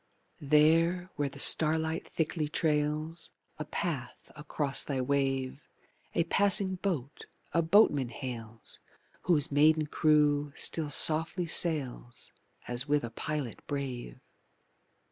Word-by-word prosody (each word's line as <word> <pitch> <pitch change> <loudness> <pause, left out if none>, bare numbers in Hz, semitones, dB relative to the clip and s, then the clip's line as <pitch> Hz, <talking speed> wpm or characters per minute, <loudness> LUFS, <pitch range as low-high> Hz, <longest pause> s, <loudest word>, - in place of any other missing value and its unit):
There, 165 +5 +2
where 145 -1 -1
the - - -13
starlight 160 +1 +3
thickly 155 -1 -2
trails 155 +2 -1 0.3
A 155 - -4
path 140 -8 -5
across 150 -2 0
thy 140 -2 -3
wave, 135 0 -1 0.5
A - - +3
passing 190 +1 +2
boat 160 -8 -4 0.3
a 170 - +3
boatman 160 - +3
hails 115 -2 -7 0.5
Whose 150 -4 +2
maiden 155 +2 +4
crew 150 -1 +2
still 155 -3 +1
softly 160 +5 +2
sails 140 -8 -1 0.4
As 120 +3 -2
with 145 -1 +1
a 120 - -5
pilot 150 -5 -4
brave. 130 - -5
150 Hz, 110 wpm, -30 LUFS, 135-160 Hz, 0.5 s, maiden